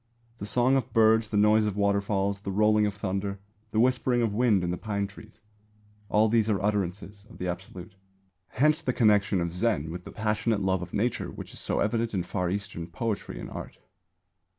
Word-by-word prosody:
The 100 - -5
songs 125 +4 +3
of 130 - -3
birds, 110 -1 +4
the 105 - -1
noise 105 +1 +4
of 105 -1 -2
waterfalls, 100 -1 +1
the 100 - -6
rolling 105 +1 +3
of 100 - -3
thunder, 100 0 -3 0.3
the 110 - -1
whispering 125 0 +2
of 110 -3 0
wind 110 -4 +3
in 85 - -1
the - - -1
pine 100 -1 -2
trees 105 +2 -13 0.7
all 105 +2 +4
these 110 0 +2
are 100 -3 +1
utterances 100 0 -2
of - - -13
the 90 - -3
Absolute. 90 0 -7 0.5
Hence 150 +7 +2
the 130 -6 -1
connection 105 -5 +3
of 85 0 -2
Zen 90 -4 0
with 90 +1 -7
the - - -10
passionate 105 0 0
love 95 -1 +1
of 90 0 -7
Nature 120 +3 -1
which - - -9
is - - -5
so - - -1
evident 115 +1 0
in 90 - 0
Far 90 0 -2
Eastern 90 -3 -4
poetry 105 +5 -4
and - - -8
art. - - -8
105 Hz, 195 wpm, -27 LUFS, 95-110 Hz, 0.7 s, birds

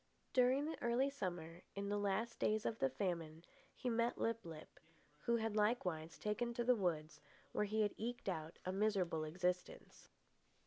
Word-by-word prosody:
During 260 +3 +5
the 320 - -4
early 250 +4 +2
summer, 175 -9 -4
in 200 0 -2
the 205 0 +1
last 205 +4 0
days 215 0 +2
of 225 - -1
the 135 - +3
famine, 165 +2 -2 0.3
he 255 - -4
met 235 0 +2
Lip 230 0 0
lip, 160 -2 -9 0.4
who 235 +10 +2
had 225 -2 0
likewise 185 -7 +1
taken 235 +3 -1
to 240 - +1
the 250 +1 +5
woods, 165 -6 -1 0.3
where 210 - +1
he 215 +1 +2
had 205 - +1
eked 240 +1 -3
out 160 -3 -2
a 185 - 0
miserable 190 -5 +1
existence. 180 - -2
205 Hz, 170 wpm, -40 LUFS, 170-235 Hz, 0.4 s, During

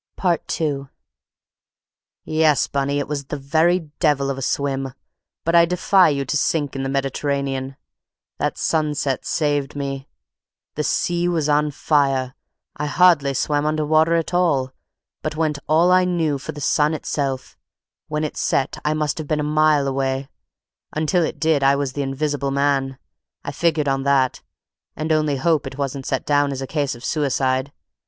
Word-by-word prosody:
II 155 -5 0 1.4
"Yes, 155 -2 +3
Bunny, 140 0 -1
it 145 - -2
was 145 -1 -3
the - - -5
very 160 +4 +1
devil 140 -4 +2
of 135 - -4
a - - -6
swim; 135 -1 -2 0.5
but 165 - 0
I 170 0 +7
defy 180 +1 +4
you 140 -2 -1
to 135 - -2
sink 145 -1 0
in 135 - -2
the 135 - -2
Mediterranean. 135 0 -2 0.6
That - - -1
sunset 150 -4 -1
saved 145 -3 0
me. 135 -1 -4 0.7
The 150 - -2
sea 175 +3 0
was 165 -4 0
on 150 0 +2
fire. 135 -3 +1 0.4
I 150 0 -3
hardly 150 -5 +4
swam 145 +2 0
under 155 0 0
water 160 +2 +3
at 165 +1 -1
all, 145 -8 +2 0.5
but - - -3
went 155 -2 0
all 165 +4 +4
I 185 0 +5
knew 165 -6 0
for - - -6
the 145 - -9
sun 150 +3 +2
itself; 135 -4 -3 0.5
when 150 0 -2
it 155 - -3
set 135 - 0
I 150 +1 +1
must 150 0 -1
have 155 - -5
been 155 0 0
a - - 0
mile 150 -1 +3
away; 135 0 -1 0.6
until 160 +3 +1
it 155 - -3
did 160 -2 +2
I 135 +1 +4
was 140 -2 -2
the 145 - -2
invisible 140 +1 -2
man. 135 -1 0 0.5
I - - -4
figured 155 0 +1
on 135 0 +1
that, 135 -2 +1 0.5
and 155 +1 -3
only 155 -2 +2
hope 150 +1 +1
it 135 0 -8
wasn't 140 -1 -3
set 135 - -1
down 145 -1 +2
as 135 - -4
a 135 - -3
case 145 -2 -2
of 120 - -10
suicide. 135 -2 0
145 Hz, 170 wpm, -21 LUFS, 135-155 Hz, 1.4 s, I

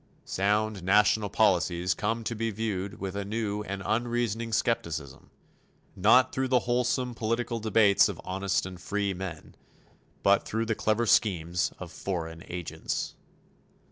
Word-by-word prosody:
Sound 105 +1 0
national 105 +2 +3
policies 90 -3 +2
come 115 +4 -2
to 115 - -2
be 115 0 -2
viewed 100 -3 -3
with 95 -1 -4
a 100 - -2
new 105 0 -2
and 100 -2 -5
unreasoning 115 -1 -1
skepticism, 80 - -2 0.7
not 110 +6 +5
through 130 0 -1
the 125 -1 +3
wholesome 125 +1 0
political 115 +1 -2
debates 110 -2 +4
of - - -6
honest 95 +1 -1
and 90 -1 -8
free 100 -1 -1
men, 90 -4 -7 0.7
but 100 0 +4
through 115 +1 -2
the 110 - 0
clever 110 +2 +1
schemes 90 -5 +2
of 90 -2 -8
foreign 85 -2 -4
agents. 90 -2 -4
105 Hz, 140 wpm, -28 LUFS, 95-115 Hz, 0.7 s, not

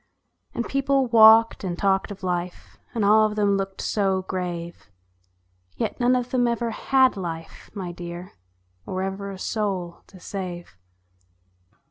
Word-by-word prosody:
And 235 - -2
people 275 0 +1
walked 225 -1 +6
and 175 -2 -3
talked 195 0 +1
of 200 -1 -9
life, 180 -1 -4 0.2
And 220 -3 +1
all 215 +1 +5
of 210 - -6
them 205 -2 +2
looked 195 0 -3
so 190 -3 0
grave; 175 - -5 0.9
Yet - - -3
none 245 +1 +3
of 250 0 -2
them 245 -2 +2
ever 235 0 -1
had 260 +3 +3
life, 165 -4 -7
my 185 -3 -4
dear, 175 +1 -8 0.6
Or 185 0 -3
ever 195 +1 -4
a 195 - -7
soul 190 -5 -3
to 190 - -15
save. 175 - -7
195 Hz, 145 wpm, -24 LUFS, 180-225 Hz, 0.9 s, walked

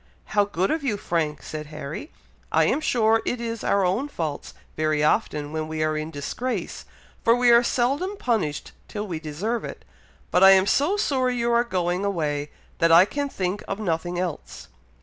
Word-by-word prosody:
"How 205 -1 +4
good 190 -1 -1
of 315 -2 -1
you, 230 -7 0
Frank!" 155 -6 -2
said 155 -1 -6
Harry. 155 - -7 0.4
"I - - +4
am 310 - +1
sure 225 -5 +2
it 245 - -2
is 230 -1 -4
our 200 -1 +2
own 200 +11 0
faults 160 - -5 0.2
very 155 -1 +1
often 150 -1 0
when 155 0 -2
we 155 0 -2
are 155 0 0
in 155 +1 -3
disgrace, 165 - -4 0.4
for 230 - +5
we 245 0 +4
are 235 0 +7
seldom 275 +12 0
punished 215 - -1 0.2
till 210 0 -5
we 170 -6 -4
deserve 175 +10 -3
it; - - -8 0.5
but 180 - +4
I 195 0 +10
am 190 0 +4
so 300 - +2
sorry 260 -9 +1
you 235 0 +1
are 235 0 +4
going 180 -4 -1
away, 150 -7 -1 0.3
that 165 0 +4
I 170 +3 +8
can 285 +6 -3
think 190 -3 -3
of 195 - -3
nothing 175 -3 -2
else." 175 -4 -5
195 Hz, 190 wpm, -24 LUFS, 155-235 Hz, 0.5 s, I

